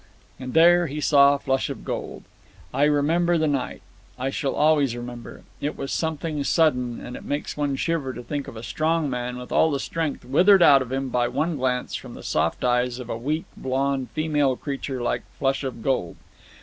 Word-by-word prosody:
And 130 +1 -6
there 175 +1 +6
he 150 +2 -5
saw 140 -1 +5
Flush 135 -1 -1
of - - -7
Gold. - - -5 0.5
I 140 +3 +3
remember 165 +4 +2
the 160 - +1
night. 140 -3 -2 0.3
I 130 +2 -2
shall 135 0 -2
always 145 -5 +3
remember. 120 -1 -8 0.2
It 145 - -3
was 135 - -4
something 160 -2 -2
sudden, 125 -7 +1
and 125 - -8
it - - -9
makes 145 +1 -3
one 145 -2 -1
shiver 155 -2 -1
to 125 - -8
think 145 +2 -4
of 115 - -9
a 110 - -8
strong 155 +3 0
man 125 0 -3
with 125 0 -9
all 160 - +4
the 140 -3 -1
strength 160 -3 -3
withered 180 +8 +5
out 140 -4 +7
of 130 -1 -5
him 135 0 -2
by 120 -1 +1
one 160 +6 -1
glance 125 -2 -1
from - - -6
the - - -10
soft 80 +2 -1
eyes 125 0 +1
of 125 -2 -7
a - - -2
weak, 150 +7 -2
blond, 135 0 -1
female 150 -4 +1
creature 135 -2 -4
like - - 0 0.2
Flush 135 +1 0
of 120 -4 -5
Gold. 125 -11 -1
140 Hz, 200 wpm, -24 LUFS, 125-155 Hz, 0.5 s, out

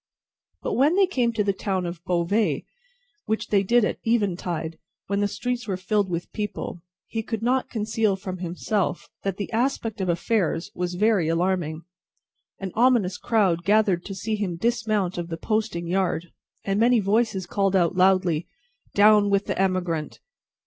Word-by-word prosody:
But - - -1
when 290 +7 +3
they 390 0 +5
came 250 -10 0
to 215 -2 +1
the 200 -1 +1
town 190 -2 -2
of 170 0 -6
Beauvais 180 +5 +1 0.6
which 220 0 -1
they 200 -2 +4
did 235 +3 +3
at - - -2
eventide, 175 -7 -1 0.3
when 200 0 -1
the 205 - +2
streets 245 +3 -3
were 190 -3 -1
filled 195 +1 0
with 170 0 -4
people 210 -4 -4 0.2
he 225 - -3
could 225 0 -4
not 255 +2 +1
conceal 220 -2 0
from 190 -1 -6
himself 180 +2 -2
that 195 -1 -2
the 205 - -4
aspect 230 -3 -1
of 185 - -1
affairs 170 -1 0
was 180 0 -3
very 205 -3 +2
alarming. 165 -1 0 0.7
An 195 -2 -5
ominous 225 -6 +3
crowd 190 -7 +2
gathered 200 -3 +3
to 195 - -6
see 215 +3 -2
him 200 -5 -2
dismount 215 -4 0
of 170 - -4
the 165 -1 -5
posting 215 -3 -1
yard, 175 -2 -1 0.3
and 195 +1 0
many 235 +1 +5
voices 205 -1 +1
called 195 -1 0
out 175 -1 +2
loudly, 185 -3 +3 0.5
"Down 210 0 +6
with 200 0 +2
the - - -1
emigrant!" 180 -5 -1
195 Hz, 165 wpm, -25 LUFS, 180-220 Hz, 0.7 s, Down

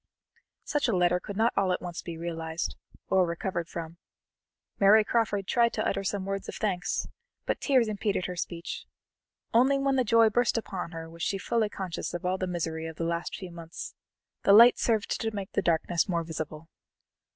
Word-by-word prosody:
'" - - -40
Such 295 -3 0
a 225 - +1
letter 180 0 +3
could 200 +2 -7
not 225 +2 +3
all 195 -2 +2
at - - 0
once 175 -1 -6
be 170 -2 -7
realized, 165 -1 -3 0.4
or 190 -1 +5
recovered 170 0 -2
from. 165 0 -7 0.8
Mary 210 +2 +7
Crawford 210 -3 0
tried 235 +2 +2
to - - -1
utter 195 - -1
some 195 -1 -2
words 195 0 -3
of - - -6
thanks, 190 -4 -1 0.4
but - - -1
tears 260 -5 +3
impeded 205 -3 -1
her 180 - -4
speech. 170 0 -5 0.7
Only 260 +4 +5
when 275 -1 +1
the 255 - +3
joy 230 0 +5
burst 245 +1 +2
upon 190 -6 -4
her 165 -1 -7
was 165 +1 -12
she 195 - 0
fully 220 +2 0
conscious 185 -4 -4
of 175 - -5
all 185 +1 0
the 185 - -1
misery 160 -2 -3
of 160 - -7
the 165 - -3
last 170 +1 -2
few 185 -2 -8
months; 170 -1 -8 0.5
the 200 - +5
light 235 +4 +8
served 220 -3 0
to 225 -1 -2
make 195 -2 -5
the - - +1
darkness 170 +2 +1
more 170 -2 0
visible. 160 -1 -6
185 Hz, 195 wpm, -28 LUFS, 170-220 Hz, 0.8 s, light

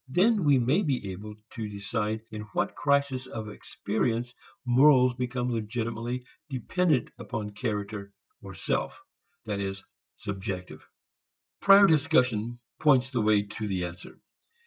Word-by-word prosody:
Then 195 - +3
we 145 -2 +6
may 130 - +3
be 130 - -1
able 105 +3 -8 0.2
to 110 -4 -4
decide 105 +2 -2
in 110 -1 -5
what - - 0
crisis 140 -2 +1
of 110 -3 -6
experience 115 +3 -2 0.3
morals 130 0 +6
become 125 0 -2
legitimately 115 +2 -3 0.2
dependent 145 +2 +1
upon 105 -2 -4
character 100 -1 -4 0.3
or - - -9
self - - -2 0.5
that 105 -2 -2
is, 95 -1 -4 0.3
"subjective." 95 -2 -5 0.8
Prior 200 0 +8
discussion 125 - +2 0.2
points 130 -4 +4
the 120 -4 0
way 105 -1 +4
to 105 +1 -6
the 95 -3 -1
answer. 90 +1 -9
115 Hz, 125 wpm, -28 LUFS, 105-130 Hz, 0.8 s, Prior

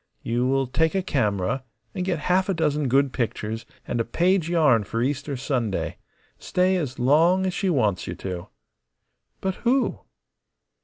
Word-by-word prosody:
You 120 +2 0
will 135 0 +2
take 160 +7 +1
a 190 - +1
camera 110 - 0 0.3
and 180 - -2
get 180 -2 0
half 185 +2 +2
a 195 - +1
dozen 150 -3 +1
good 135 +1 +2
pictures, 115 -2 -3 0.2
and 120 - -1
a - - +1
page 175 +7 +1
yarn 150 -10 +4
for 115 +4 -2
Easter 140 +1 -2
Sunday. 120 -6 -2 0.4
Stay 185 +1 +1
as 145 -8 -2
long 165 +9 +4
as 185 - -1
she 190 +2 0
wants 110 - +1
you - - -4
to." 90 -2 -6 0.9
"But 190 0 0
who?" 255 +2 +1
140 Hz, 160 wpm, -24 LUFS, 120-180 Hz, 0.9 s, yarn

